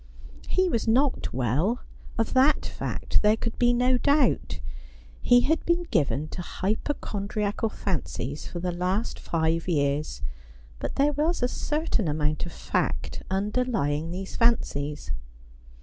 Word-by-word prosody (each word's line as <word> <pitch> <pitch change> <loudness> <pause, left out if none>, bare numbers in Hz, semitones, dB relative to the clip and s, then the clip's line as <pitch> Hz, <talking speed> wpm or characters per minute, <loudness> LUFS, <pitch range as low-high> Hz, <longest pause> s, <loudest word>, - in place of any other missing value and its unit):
He 370 0 +3
was 230 -9 0
not 260 +4 +2
well. 140 - +1 0.4
Of 225 - 0
that 270 +4 +4
fact - - -1
there 210 +1 +4
could 230 0 -4
be 245 0 +5
no 250 +1 +3
doubt. 285 +2 +2 0.6
He 245 0 +6
had 320 +5 +1
been 340 +1 +2
given 155 - +1
to - - -5
hypochondriacal 210 +1 -2
fancies 150 - -3
for 175 - -5
the 180 +1 -1
last 180 +5 -1
five 165 0 0
years, 140 - 0 0.6
but - - -4
there 290 +2 +3
was 305 0 0
a - - +4
certain 295 - -1
amount 150 +2 0
of - - -8
fact - - -2
underlying 190 - 0
these 185 +2 -5
fancies. 150 -11 +1
210 Hz, 135 wpm, -27 LUFS, 160-250 Hz, 0.6 s, He